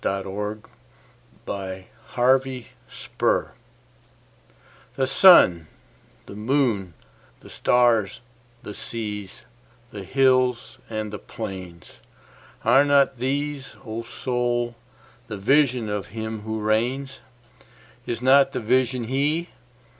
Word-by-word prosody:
The 100 +2 -3 0.9
Higher 95 -1 -6 0.3
Pantheism 130 0 -1 1.4
THE 135 - +1
SUN, 110 - +6 0.6
the 100 - -11
moon, 105 - 0 0.5
the - - -14
stars, 120 -2 +2 0.4
the 105 - -7
seas, 105 -3 -6 0.5
the 100 -2 -7
hills 130 +1 +1
and 110 -1 -4
the 105 - -5
plains—Are 95 - -3
not 140 -3 +3
these, 140 +1 -3
O 110 0 -5
Soul, 120 0 -2 0.5
the 105 -2 -6
Vision 125 +2 +2
of 105 -1 -3
Him 110 0 -6
who 110 +1 -4
reigns? 125 +6 -1 0.9
Is 120 +1 -3
not 135 +1 +5
the - - -2
Vision 125 +1 +1
He? 145 +8 -1
120 Hz, 95 wpm, -23 LUFS, 105-130 Hz, 1.4 s, SUN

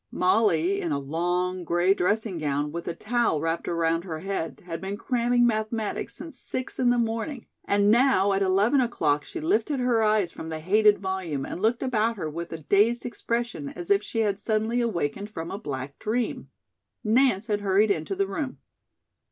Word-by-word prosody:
Molly, 185 -1 +2
in 170 - -2
a 145 - +1
long, 175 +5 -1
gray 175 +3 +3
dressing 205 -1 0
gown, 145 -1 -1
with 170 +2 -6
a 170 - -2
towel 235 -8 0
wrapped 165 +2 -2
around 165 0 +1
her 165 -4 -5
head, 195 -4 -4
had 165 -2 -5
been 195 +1 -4
cramming 240 +1 +2
mathematics 220 -1 -1
since 320 -2 -8
six 255 0 -5
in 250 -1 +3
the 245 - +3
morning, 230 +3 -2 0.2
and 205 +1 +3
now 230 -5 +4
at 195 - 0
eleven 200 +8 +3
o'clock, 150 - +1
she 345 - -7
lifted 315 -4 0
her 245 -2 +2
eyes 215 -5 +2
from 160 - -8
the 160 -1 -4
hated 210 +5 +4
volume 185 -8 -3
and 180 - -6
looked 230 +3 +1
about 230 -3 +1
her 170 - -3
with 170 +2 -6
a 165 - -4
dazed 205 +9 +2
expression 235 - -3
as 175 +2 -6
if 200 0 +5
she 225 +1 -2
had 205 -2 0
suddenly 220 +3 0
awakened 200 -3 -2
from 165 -6 -6
a 200 - -4
black 140 -7 -6
dream. 230 +3 -2 0.5
Nance 225 -2 +3
had 210 -2 -1
hurried 200 +2 +3
into 165 +2 -1
the 195 +1 +1
room. 255 +8 -4
200 Hz, 185 wpm, -26 LUFS, 170-230 Hz, 0.5 s, if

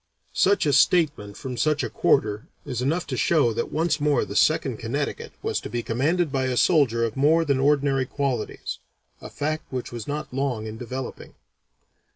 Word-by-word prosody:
Such 200 -2 +3
a 145 - +2
statement 145 - +2
from 125 -2 -6
such 150 +5 +1
a - - -2
quarter 105 -4 +1 0.2
is 125 -2 -3
enough 160 +7 0
to - - -4
show 145 -9 +2
that 115 - -3
once 160 -1 0
more 145 -3 +2
the - - -8
Second - - +2
Connecticut - - -3
was - - 0
to - - -7
be 120 -1 -3
commanded 150 +8 0
by 135 -1 0
a 130 -1 -1
soldier 130 -9 +3
of 115 - -4
more 160 +4 +3
than 140 -3 +1
ordinary 140 -2 +2
qualities, 135 -6 -3 0.4
a - - -8
fact 155 +2 -3
which 130 -2 -4
was 120 -2 -7
not 150 -2 -4
long 130 -5 -1
in 110 0 -6
developing. 125 +3 -7
135 Hz, 185 wpm, -24 LUFS, 120-150 Hz, 0.4 s, Such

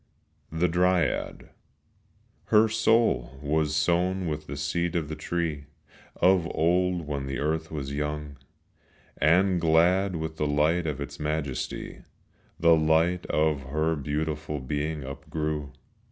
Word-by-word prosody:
The 80 +2 +1
Dryad 90 +1 0 0.9
Her 110 0 +5
soul 110 - +2
was 75 +1 0
sown 90 +4 +1
with 75 -1 -4
the 70 - -6
seed 85 +4 -1
of 80 -3 -1
the 80 - -4
tree 80 -5 -3 0.5
Of 90 -1 +3
old 90 +1 +1
when 70 -2 -4
the 70 0 -3
earth 80 +2 -1
was 70 -3 -5
young, 75 0 -4 0.8
And 90 +3 +3
glad 90 +4 +3
with 80 0 -4
the 75 - 0
light 80 +4 +1
of 75 -2 -3
its 70 - -7
majesty 75 -3 -3 0.6
The 85 0 +6
light 80 +3 +2
of 75 -2 +1
her 80 +3 0
beautiful 75 +1 -3
being 75 +3 -3
upgrew. 75 +1 -4
80 Hz, 125 wpm, -27 LUFS, 75-85 Hz, 0.9 s, The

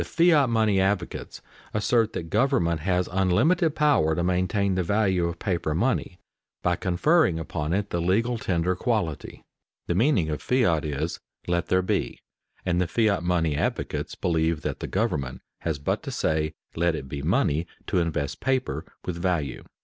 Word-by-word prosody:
_The - - -3 0.3
fiat 145 -5 +4
money 110 -4 +2
advocates 95 -2 -2 0.3
assert 110 +1 +2
that 80 -1 -5
government 105 - +2
has 90 +2 0
unlimited 140 - +2
power 140 - +3
to 85 - 0
maintain 95 +2 +1
the 95 - +1
value 95 -2 +1
of 85 0 -4
paper 85 -6 -1
money 100 -2 0 0.5
by 90 0 +2
conferring 95 - +2
upon 80 -1 -3
it 100 +2 -1
the 85 - 0
legal 115 +7 +1
tender 90 -2 0
quality._ 95 - -2 0.4
The - - 0
meaning 95 - +2
of 75 - -3
fiat 90 - +2
is 75 -2 -3 0.3
"let 85 -1 0
there 95 0 +2
be," - - -1 0.5
and 90 -1 +1
the 90 - +1
fiat 105 -1 +2
money 85 -4 +1
advocates 75 - -2
believe 80 -2 0
that - - -3
the - - -4
government 65 -2 -2 0.2
has 80 -3 -2
but 70 - -1
to - - -7
say, 80 0 -1 0.2
"let 85 0 +1
it 65 -3 -6
be 70 +1 -5
money," 85 - +1 0.2
to - - +1
invest 80 -4 -2
paper 130 -1 -1 0.2
with 90 -2 -3
value. 85 -8 -1
90 Hz, 165 wpm, -26 LUFS, 80-105 Hz, 0.5 s, fiat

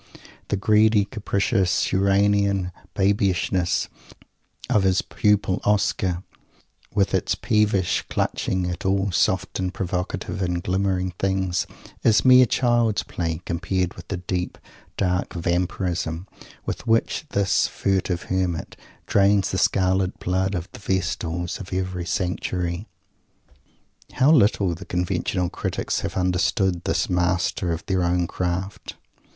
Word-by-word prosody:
The 100 - 0
greedy, 105 +1 +4
capricious 100 -3 0
"Uranian 100 -1 +2 0.2
Babyishness" 95 -2 +1 0.8
of 105 - +3
his 95 -1 +2
pupil 105 -3 +1
Oscar, 95 -3 +1 0.7
with 100 -2 +1
its - - +1
peevish 105 -4 +1
clutching 95 -1 -1
at 90 -1 -4
all 95 +1 +1
soft 90 - +1
and 95 -1 -1
provocative 95 +2 -3
and 90 -1 -1
glimmering 95 -1 0
things, 95 -2 0 0.3
is 110 +2 +3
mere 130 -1 +8
child's 120 -5 +2
play, 85 -1 -3
compared 90 +1 -1
with 85 - -12
the 95 - -3
deep, 90 0 -3 0.4
dark 90 -1 0
Vampirism 90 0 -1 0.4
with - - -5
which 115 +7 +1
this 100 -1 +2
furtive 95 -3 -1
Hermit 90 -3 -2 0.3
drains 100 0 +3
the 95 - 0
scarlet 95 0 +1
blood 95 +2 0
of 85 0 -4
the - - -11
Vestals 90 -3 -2
of 100 - -9
every 90 -1 -2
Sanctuary. 90 0 -2 1.3
How 135 +4 +4
little 100 - +4
the 85 +4 -8
conventional 90 0 -1
critics - - -2
have - - -4
understood 90 0 +1
this - - +1
master 90 0 0
of 85 +1 -4
their 95 -2 0
own 90 0 +1
craft! 90 +2 -4
95 Hz, 120 wpm, -23 LUFS, 90-100 Hz, 1.3 s, mere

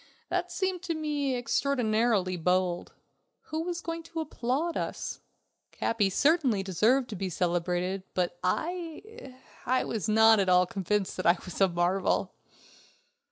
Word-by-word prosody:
That 360 0 -1
seemed 370 0 -1
to 350 -3 -3
me 295 -4 -1
extraordinarily 230 -6 +1
bold. 180 +1 0 0.6
Who 315 +1 -1
was 345 0 -3
going 330 0 -4
to 330 0 -7
applaud 300 +2 -2
us? - - -4 0.5
Capi 210 -4 0
certainly 270 - +2
deserved 220 +8 +2
to 215 - -5
be 190 0 -3
celebrated, 180 +2 -1
but 175 -1 -1
I... 330 - -4 0.3
I 255 +1 +2
was 220 -1 -3
not 220 0 +6
at 190 -1 +2
all 180 0 +5
convinced 195 +2 -2
that 185 - -1
I 170 +1 +5
was 180 +1 -6
a 195 - +7
marvel. 175 +2 0
220 Hz, 140 wpm, -29 LUFS, -, 0.6 s, a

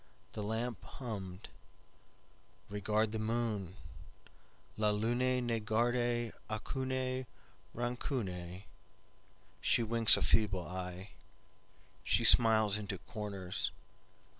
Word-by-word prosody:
The 105 - -4
lamp 110 +3 -2
hummed:"Regard 105 0 -6
the 110 - -2
moon, 110 -4 -1 1.0
La 105 -1 +2
lune 120 +4 +1
ne 115 -1 0
garde 120 +1 +1 0.2
aucune 130 +3 -2 0.5
rancune, 100 -7 -3 1.0
She 120 - +3
winks 115 -1 +5
a - - 0
feeble 100 -5 +2
eye, 90 +1 -6 0.9
She - - +2
smiles 110 -3 +6
into 100 -2 -4
corners. 100 -1 -3
110 Hz, 85 wpm, -34 LUFS, 100-120 Hz, 1.0 s, smiles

